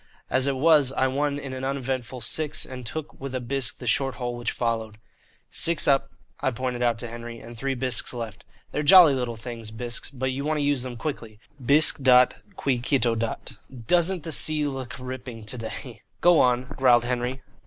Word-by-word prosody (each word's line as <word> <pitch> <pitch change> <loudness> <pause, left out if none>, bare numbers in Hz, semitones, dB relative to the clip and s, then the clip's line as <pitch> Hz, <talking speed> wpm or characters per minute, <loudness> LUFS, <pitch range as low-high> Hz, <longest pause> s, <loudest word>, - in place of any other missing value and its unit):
As 130 +1 +2
it 140 - +1
was 145 -1 +4
I 130 - +1
won 140 +2 0
in 140 -2 -6
an 130 0 -6
uneventful 130 -2 -3
six, 150 +7 0
and 125 -2 -8
took 155 +2 -7
with 135 -1 -5
a - - 0
bisque 130 0 -3
the 125 - -9
short 135 +2 +1
hole 120 -2 -4
which 120 0 -2
followed. 115 -2 -2 0.5
"Six 165 -3 +3
up," 135 -1 +3 0.3
I - - +1
pointed 125 0 -3
out 120 -2 +2
to 120 - -4
Henry, 115 0 -8
"and 120 +1 -11
three 135 +3 -2
bisques 125 -2 -1
left. 115 -5 -7 0.3
They're 150 - -1
jolly 170 -1 +8
little 125 -3 -2
things, 115 -1 -7
bisques, 120 +2 -5
but 130 -1 -3
you 135 +2 -4
want 155 +1 0
to 145 - 0
use 145 -2 +1
them 125 -1 -5
quickly. 115 -5 -5 0.2
Bisque 145 +3 +4
dat 125 -1 +6 0.2
qui 135 -7 0
cito 125 -2 +1
dat. 115 0 -3 0.3
Doesn't 175 +3 +2
the 160 - -5
sea 150 +3 +3
look 135 -2 -5
ripping 125 -3 -7
to 115 +4 -8
day?" 115 +1 -7 0.2
"Go 175 -2 +5
on," 125 0 +3
growled 125 -3 +4
Henry. 125 +1 -2
130 Hz, 195 wpm, -25 LUFS, 120-140 Hz, 0.5 s, jolly